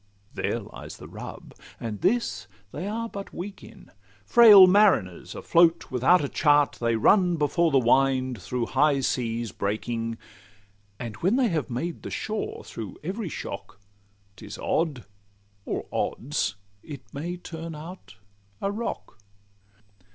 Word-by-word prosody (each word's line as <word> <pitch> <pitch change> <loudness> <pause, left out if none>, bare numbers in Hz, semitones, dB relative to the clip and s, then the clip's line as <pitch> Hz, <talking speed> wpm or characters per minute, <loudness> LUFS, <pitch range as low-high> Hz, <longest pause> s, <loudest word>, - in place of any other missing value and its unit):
There - - -1
lies - - -10
the - - -11
rub—and 105 -3 -9
this 230 - 0 0.2
they 185 - -5
are 230 +2 -3
but 200 -3 -8
weak 195 +3 -7
in. - - -15 0.3
Frail 210 - +9
mariners 185 - +3
afloat 170 -2 +3
without 130 +7 +4
a - - 0
chart, 145 0 +3
They 115 -1 +1
run 180 - +4
before 165 +2 +2
the 140 - +3
wind 130 -2 +2
through 120 +5 -2
high 145 +2 +2
seas 115 -3 -1
breaking; 115 +3 -3 0.8
And 115 -4 -6
when 190 +7 +1
they 255 -3 +3
have 160 -6 -2
made 160 +8 -4
the - - -7
shore 215 0 -4
through 110 -5 -8
every 190 +3 -4
shock, 100 - -7 0.6
'Tis - - -9
odd, 150 - -1 0.6
or - - -3
odds, 130 - -2 0.3
it 145 -3 -9
may 170 +5 -4
turn 165 -2 -7
out 165 +5 -10 0.4
a 195 - -1
rock. 210 - -5
150 Hz, 135 wpm, -26 LUFS, 120-185 Hz, 0.8 s, Frail